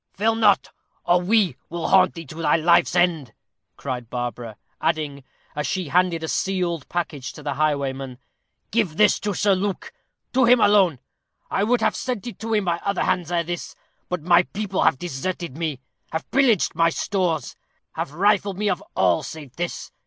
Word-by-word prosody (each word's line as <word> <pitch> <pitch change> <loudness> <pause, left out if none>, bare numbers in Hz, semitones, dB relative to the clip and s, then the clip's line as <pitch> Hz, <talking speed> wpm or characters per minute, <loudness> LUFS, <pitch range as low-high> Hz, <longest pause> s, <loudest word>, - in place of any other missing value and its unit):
"Fail 220 +3 +2
not, 220 -2 +3 0.3
or 175 +1 +3
we 190 - +2
will 170 0 -3
haunt 185 -1 +5
thee 165 -1 -7
to 155 +4 -8
thy - - +3
life's 170 +2 +3
end," 165 -9 +1 0.4
cried 125 -4 -5
Barbara; 120 -3 -5 0.2
adding, 150 -4 -1 0.3
as 150 0 -2
she 185 -5 -2
handed 175 0 +2
a - - -2
sealed 175 -5 -1
package 155 -6 -3
to - - -11
the 145 - -2
highwayman, 135 -3 -1 0.5
"Give 195 -8 0
this 210 -1 +4
to 205 -2 -2
Sir 205 +1 +3
Luke 195 +1 -3 0.4
to 260 -1 +4
him 245 +1 +6
alone. 200 - +4 0.5
I 195 - +1
would 235 +2 +2
have - - +2
sent 250 -6 -3
it 240 - -7
to 225 0 -1
him 210 -2 +1
by 170 -1 +1
other 200 -1 0
hands 175 -2 0
ere 170 -1 +1
this, 175 +1 -5 0.3
but 180 -4 -3
my 175 +1 +6
people 195 +1 -3
have - - +3
deserted 170 0 -4
me 155 -5 -3 0.3
have 160 - -5
pillaged 250 -8 +3
my 165 +1 +3
stores 175 -2 -1 0.4
have - - -4
rifled 200 +3 +1
me 210 0 +1
of 180 - -3
all 90 -2 +3
save 145 -6 -9
this. 175 0 -4
175 Hz, 180 wpm, -23 LUFS, 150-200 Hz, 0.5 s, him